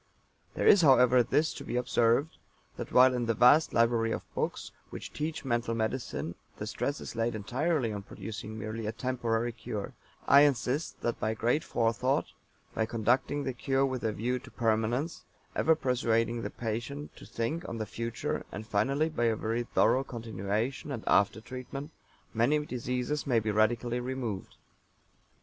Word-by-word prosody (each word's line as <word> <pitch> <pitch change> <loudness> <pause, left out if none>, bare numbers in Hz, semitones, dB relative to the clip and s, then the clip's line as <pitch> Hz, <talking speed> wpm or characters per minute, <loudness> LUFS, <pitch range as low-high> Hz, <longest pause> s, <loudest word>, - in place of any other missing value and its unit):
There - - -1
is, 200 - +7
however, 125 -4 +6
this 150 +6 +1
to - - -8
be - - -4
observed, 125 +4 +2 0.4
that - - -6
while 130 +1 +7
in 120 -2 -1
the 115 - +1
vast 125 +8 +6
library 115 -1 +2
of - - -5
books - - -3 0.2
which - - -8
teach 155 -1 -3
mental 120 -2 0
medicine 115 +3 -2 0.2
the - - -4
stress 140 - -2
is - - -7
laid 115 0 0
entirely 125 +3 0
on 100 - -4
producing 110 +2 -7
merely 110 0 -4
a - - 0
temporary 120 -1 -1
cure 110 -3 -6 0.3
I 140 - +8
insist 140 +1 +1
that 120 - -1
by 110 +1 -1
great 120 +8 +1
Forethought, 120 +4 0 0.4
by 110 - 0
conducting 125 +6 +1
the 130 - -2
cure 135 +2 +1
with 130 -2 -3
a 110 - +1
view 125 +4 -1
to - - -13
permanence, 115 +6 0 0.3
ever 160 - +4
persuading 115 -4 +1
the - - -3
patient 120 +6 -5
to - - -11
think 155 +10 -3
on 115 - -4
the 110 - -2
future, 115 +2 -3
and 105 +2 -6
finally 135 +8 +1
by 155 -7 -1
a 115 -1 +3
very 115 +2 -1
thorough 130 +2 +2
continuation 115 +3 -3
and 120 -5 -4
after 100 +2 +3
treatment 130 +4 -7 0.4
many 120 +7 +3
diseases 125 +3 -2
may 120 -4 +3
be 110 -1 -1
radically 120 +3 +1
removed. 125 -6 -4
120 Hz, 165 wpm, -30 LUFS, 115-130 Hz, 0.4 s, I